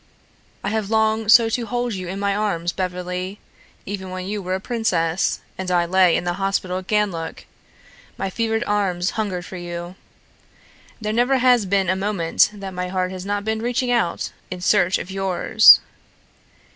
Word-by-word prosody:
"I - - -1
have 215 -2 -2
longed 220 0 +2
so 230 -1 +7
to 235 +1 -1
hold 245 0 -2
you 185 -2 -5
in 190 +2 -5
my 200 0 0
arms, 175 -5 -1
Beverly 180 +1 -4 0.5
even 190 -1 -5
when 185 0 -5
you 205 +1 -3
were 185 0 -2
a - - -3
princess 190 -7 0 0.2
and 190 -1 -3
I 175 -1 +2
lay 180 0 +4
in - - -3
the 175 0 -1
hospital 190 -1 -1
at 185 - -12
Ganlook, 195 -7 -1 0.7
my 195 - -3
fevered 225 +2 -1
arms 195 -4 0
hungered 195 -5 -3
for 185 - -8
you. 175 0 -6 1.1
There 215 -1 -3
never 245 +4 +2
has 245 -5 +3
been 195 -1 +1
a 185 - +2
moment 190 -4 +2
that 195 -2 -8
my 180 0 -3
heart 185 0 -2
has 185 0 -7
not 205 0 -2
been 220 0 -1
reaching 245 +1 -1
out 235 -8 0 0.2
in 185 - -6
search 185 -1 +3
of 180 - -7
yours. 195 +2 +6
195 Hz, 175 wpm, -21 LUFS, 180-215 Hz, 1.1 s, so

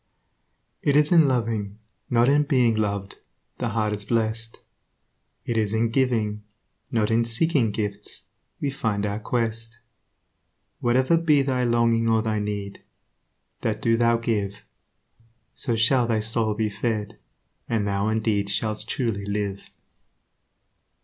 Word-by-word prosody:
It 145 - +2
is 150 +2 +4
in 165 -4 +6
loving, 110 -5 -1 0.3
not 120 0 +3
in 145 +2 +4
being 130 -6 +3
loved, 100 -2 -2 0.4
The 120 - -1
heart 110 -1 0
is 105 - -6
blessed; 115 0 -1 0.9
It 115 - -1
is 110 -1 +1
in 115 +1 +2
giving, 115 -5 0 0.5
not 110 -2 0
in 115 +1 +3
seeking 115 +1 +1
gifts, 105 -1 -4 0.4
We 140 - -1
find 105 -6 -1
our 105 +1 -2
quest. 115 0 -2 1.0
Whatever 130 +6 +3
be 155 -4 +3
thy 130 -2 0
longing 115 -1 +2
or 110 -1 +3
thy 110 -1 0
need, 100 -1 -4 0.8
That 110 -1 -1
do 115 0 +2
thou 115 0 +3
give; 105 -3 -2 0.9
So 120 -4 -2
shall 120 +2 +3
thy 115 -2 +1
soul 110 0 0
be 105 0 -1
fed, 105 0 -3 0.5
and 110 -3 0
thou 100 +1 0
indeed 110 -2 0
Shalt 110 +1 -2
truly 110 -6 -2
live. 100 -1 -3
115 Hz, 135 wpm, -24 LUFS, 105-120 Hz, 1.0 s, in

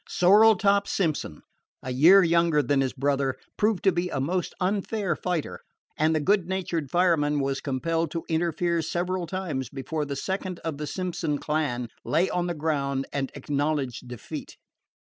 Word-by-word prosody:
Sorrel 210 +4 +6
top 200 +1 +2
Simpson, 155 - -2 0.4
a 130 - -4
year 170 +10 +7
younger 170 -3 +3
than 140 -1 +2
his 130 -1 0
brother, 140 -1 0 0.2
proved 210 -2 +1
to 195 - +5
be 175 0 -1
a - - -2
most 175 +7 -2
unfair 195 -1 -1
fighter, 155 - -3 0.4
and 155 +1 +2
the - - +2
good 190 +3 +2
natured 175 -6 -2
fireman 160 -4 +2
was 135 0 -1
compelled 165 +4 -1
to 165 +1 -5
interfere 170 +1 0
several 175 +2 -2
times 155 -9 -3
before 150 +3 -3
the 140 -1 -4
second 185 +4 -3
of 160 -3 -4
the 150 - -4
Simpson 175 -5 -2
clan 145 -6 -1 0.2
lay 165 +5 +1
on 175 0 0
the 175 - -2
ground 140 -3 -1
and 135 -2 -2
acknowledged 140 -3 -2
defeat. 125 -2 -8
160 Hz, 160 wpm, -26 LUFS, 140-180 Hz, 0.4 s, year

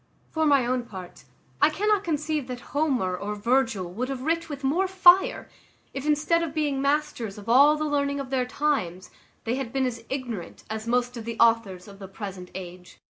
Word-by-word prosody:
For 315 -1 +1
my 280 -4 +4
own 250 0 -1
part, 185 -5 -10 0.4
I - - +6
cannot 415 +4 +1
conceive 305 -4 -2
that 250 -1 -6
Homer 265 -11 +1
or 205 +3 -4
Virgil 220 -5 0
would 250 +6 -3
have 260 -2 -4
writ 330 +2 -1
with 285 -2 -7
more 335 +8 +2
fire, 375 +5 +5 0.5
if 275 +2 -5
instead 305 +3 +2
of 325 -2 -4
being 290 -3 0
masters 280 -7 -1
of 205 +1 -11
all 280 +6 +6
the 310 - -1
learning 280 -1 0
of 270 -1 -6
their 255 -2 0
times, 250 - -1 0.3
they 235 +3 -1
had 265 -4 -4
been 270 0 0
as 235 -2 -4
ignorant 245 -9 -5
as 220 +1 -5
most 245 +1 0
of 225 - -7
the 230 -1 -5
authors 225 -6 +2
of 200 -1 -13
the 195 - -8
present 190 -2 -8
age. 180 -1 -9
255 Hz, 195 wpm, -26 LUFS, 220-300 Hz, 0.5 s, I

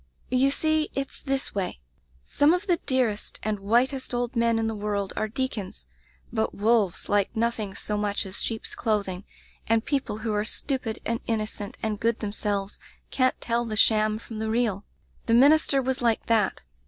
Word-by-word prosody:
"You 255 +2 +4
see, 310 +2 +1
it's 275 0 -4
this 270 -1 -1
way 190 - -3 0.3
— 65 -1 -34
some 290 - +3
of 360 +3 -4
the 355 -4 +2
dearest 250 -6 0
and 215 -1 -1
whitest 245 +6 +1
old 245 +1 -2
men 230 -1 +3
in 225 - 0
the 225 - -1
world 205 -2 -2
are 215 - 0
deacons, 225 -5 -4 0.5
but 220 -1 0
wolves 210 -3 +2
like 205 -1 +1
nothing 225 -3 -1
so 210 - -2
much 205 -1 -1
as 190 0 -3
sheep's 225 -1 -3
clothing, 200 -4 -1 0.4
and 225 0 +2
people 275 -7 -1
who 220 0 -2
are 210 0 +1
stupid 245 0 -1
and 230 0 0
innocent 215 -2 -3
and 215 -2 -1
good 230 0 +1
themselves 205 -1 -2 0.3
can't 255 -1 +2
tell 235 0 0
the 220 -2 -4
sham 215 0 +4
from 225 -1 -8
the 220 0 -2
real. 220 -4 0 0.4
The 230 - +4
minister 280 +1 +5
was 260 0 -1
like 230 -2 +1
that. 220 -4 +1
225 Hz, 180 wpm, -26 LUFS, 210-255 Hz, 0.5 s, minister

